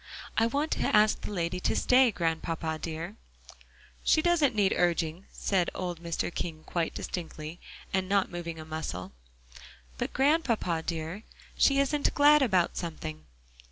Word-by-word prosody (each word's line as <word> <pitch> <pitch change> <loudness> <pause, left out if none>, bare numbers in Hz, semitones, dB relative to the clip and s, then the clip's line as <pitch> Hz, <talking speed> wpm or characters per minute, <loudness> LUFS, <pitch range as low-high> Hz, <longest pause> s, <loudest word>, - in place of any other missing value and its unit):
"I 225 - +3
want 285 +6 -1
to - - +1
ask 210 0 +4
the - - -5
lady 180 -2 -2
to - - 0
stay, 255 0 +5
Grandpapa 165 -3 -2
dear." 165 +5 -5 0.9
"She 315 - +4
doesn't 320 -8 +3
need 200 -2 +3
urging," 170 +1 0
said 185 -3 0
old 175 -2 -4
Mr. 170 0 -2
King 160 -2 -4
quite 170 -2 -2
distinctly, 165 -1 -6 0.3
and 190 0 0
not 200 -1 +2
moving 170 -2 -5
a 155 - -8
muscle. 150 - -5 0.9
"But, - - -2
Grandpapa 265 - +2
dear, 165 +4 -3 0.3
she 275 - +4
isn't 285 +1 +1
glad 295 +1 +6
about 190 -9 +2
something." 80 - -5
175 Hz, 145 wpm, -29 LUFS, 165-230 Hz, 0.9 s, glad